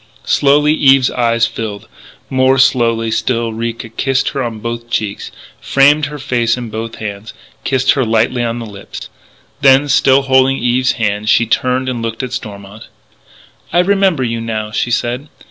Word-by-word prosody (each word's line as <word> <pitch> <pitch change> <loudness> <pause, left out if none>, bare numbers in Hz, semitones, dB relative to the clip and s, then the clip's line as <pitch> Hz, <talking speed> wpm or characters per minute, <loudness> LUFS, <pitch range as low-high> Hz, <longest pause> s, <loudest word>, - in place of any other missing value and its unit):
Slowly 145 +2 +3
Eve's 135 -3 +4
eyes 115 -1 +1
filled; 110 -2 -6 0.4
more 130 0 +2
slowly 115 -3 +2
still 115 0 -1
Ricca 115 +1 -5
kissed 135 +3 -1
her 135 - -4
on 115 -3 -4
both 115 +1 -6
cheeks, 105 -3 -3 0.3
framed 145 +2 +3
her 150 +1 -7
face 120 -4 0
in 120 -3 -6
both 115 +1 -5
hands, 105 0 -7 0.3
kissed 130 -1 +2
her 135 - +1
lightly 115 +2 +1
on 115 0 -2
the 115 - -6
lips. 100 -2 -10 0.5
Then, 135 +1 +5
still 135 0 +3
holding 135 0 +3
Eve's 125 +1 +1
hands, 105 -1 -2
she 120 - +4
turned 130 +3 0
and 125 -2 -3
looked 115 +2 -4
at 130 -1 -5
Stormont. 100 -3 -8 0.8
"I - - 0
remember 190 -5 +2
you 115 -1 -2
now," 110 -2 -4
she 120 - -1
said. 125 +4 -2
120 Hz, 165 wpm, -15 LUFS, 115-135 Hz, 0.8 s, Then